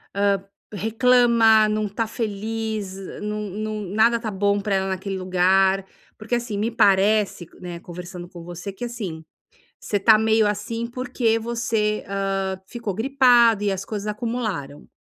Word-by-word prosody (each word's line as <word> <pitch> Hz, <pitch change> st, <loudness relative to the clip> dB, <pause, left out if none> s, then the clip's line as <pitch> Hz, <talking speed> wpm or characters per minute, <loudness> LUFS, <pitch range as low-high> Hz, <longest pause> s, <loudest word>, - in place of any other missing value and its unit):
hã, 200 Hz, -1 st, +1 dB, 0.3 s
reclama, 225 Hz, 0 st, +4 dB
não 215 Hz, 0 st, 0 dB
está 215 Hz, +3 st, -2 dB
feliz, 220 Hz, -2 st, -4 dB, 0.3 s
num 210 Hz, -1 st, -3 dB
num 215 Hz, +1 st, -4 dB
nada 230 Hz, +2 st, +4 dB
está 225 Hz, -2 st, -4 dB
bom 200 Hz, +1 st, +1 dB
para 200 Hz, 0 st, -1 dB
ela 190 Hz, 0 st, 0 dB
naquele 190 Hz, +1 st, -3 dB
lugar, 190 Hz, +1 st, +2 dB, 0.3 s
porque, 220 Hz, +3 st, -2 dB
assim, 235 Hz, -3 st, -3 dB
me 220 Hz, +3 st, -1 dB
parece, 200 Hz, -3 st, +3 dB
né, 175 Hz, -2 st, -7 dB
conversando 175 Hz, 0 st, -9 dB
com 175 Hz, -2 st, -11 dB
você 175 Hz, +3 st, -7 dB
que, 195 Hz, +5 st, -6 dB
assim, 200 Hz, -10 st, -6 dB, 0.6 s
você 205 Hz, -, -1 dB
está 220 Hz, +2 st, +6 dB
meio 220 Hz, 0 st, +3 dB
assim, 220 Hz, +3 st, -3 dB
porque 245 Hz, -2 st, 0 dB
você, 225 Hz, -2 st, -1 dB
hã, 195 Hz, -1 st, -2 dB
ficou 220 Hz, -1 st, -5 dB
gripado 240 Hz, -2 st, +4 dB
e 205 Hz, -, +1 dB
as 190 Hz, 0 st, -3 dB
coisas 210 Hz, 0 st, -5 dB
acumularam, 210 Hz, -, -4 dB
210 Hz, 150 wpm, -23 LUFS, 195-225 Hz, 0.6 s, está